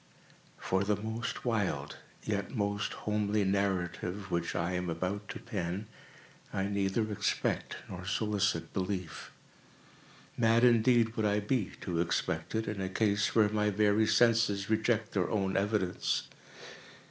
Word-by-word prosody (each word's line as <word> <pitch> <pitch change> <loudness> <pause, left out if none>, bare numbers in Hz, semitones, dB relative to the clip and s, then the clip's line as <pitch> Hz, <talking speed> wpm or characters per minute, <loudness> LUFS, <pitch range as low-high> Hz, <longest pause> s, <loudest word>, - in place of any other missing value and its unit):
For 95 +1 0
the 105 +1 +2
most 110 +4 -4
wild, 95 - -1 0.3
yet 105 +4 -2
most 100 -1 -1
homely 105 0 +1
narrative 95 -1 -1
which 85 -1 -1
I 85 +1 0
am 90 -1 -2
about 95 +5 -3
to - - -5
pen, 100 -3 -3 0.7
I 95 - -1
neither 100 +2 0
expect 105 - -1
nor 90 -1 -7
solicit 100 -5 0
belief. 95 -3 -3 1.1
Mad 115 0 +3
indeed 120 -1 +4
would 110 -1 +1
I 105 0 +2
be 105 -1 -1
to 85 -2 -1
expect 85 - -1
it, 110 0 -1
in 105 -2 -3
a 95 - -2
case 105 +1 +1
where 110 -2 +5
my 105 0 +1
very 105 +1 +3
senses 115 -4 +3
reject 110 0 +1
their 95 -3 0
own 95 -3 0
evidence. 100 -2 0
100 Hz, 135 wpm, -31 LUFS, 95-110 Hz, 1.1 s, where